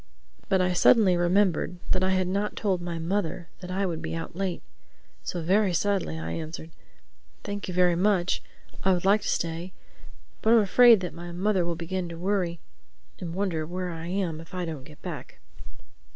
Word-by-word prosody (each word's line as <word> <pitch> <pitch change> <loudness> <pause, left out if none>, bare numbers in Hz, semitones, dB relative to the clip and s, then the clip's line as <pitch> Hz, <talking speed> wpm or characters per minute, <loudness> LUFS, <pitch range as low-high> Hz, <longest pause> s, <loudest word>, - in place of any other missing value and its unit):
But 190 -1 +3
I 180 0 +2
suddenly 190 0 +5
remembered 175 -1 +2
that 185 - +2
I 185 - +2
had 185 -1 +1
not 200 +3 -1
told 190 -4 0
my 175 -1 -4
mother 175 0 -2
that 180 - -8
I 195 +2 0
would 165 -3 -3
be 165 - -4
out 165 0 -6
late. 190 -2 -2 0.6
So 175 -2 -4
very 190 +1 +3
sadly 195 - 0
I 80 +1 -4
answered, 160 - -6 0.7
"Thank 205 0 -4
you 180 - -4
very 180 -1 +4
much. 185 -1 +2 0.4
I 190 - +4
would 180 0 -1
like 205 +2 +5
to - - -5
stay, 170 +2 -2 0.7
but 225 - +4
I - - +8
am 225 - +6
afraid 230 +1 +7
that 180 - -4
my 175 +1 -8
mother 190 +1 +1
will 170 0 -1
begin 175 +1 -3
to 170 - -7
worry 180 -2 -1 0.6
and 170 -2 -5
wonder 185 -5 -1
where 180 +2 -4
I 165 0 -6
am 175 -4 -2
if 165 +3 -12
I 180 -1 -2
don't 155 -5 -6
get 150 0 -16
back." - - -7
180 Hz, 195 wpm, -27 LUFS, 170-195 Hz, 0.7 s, I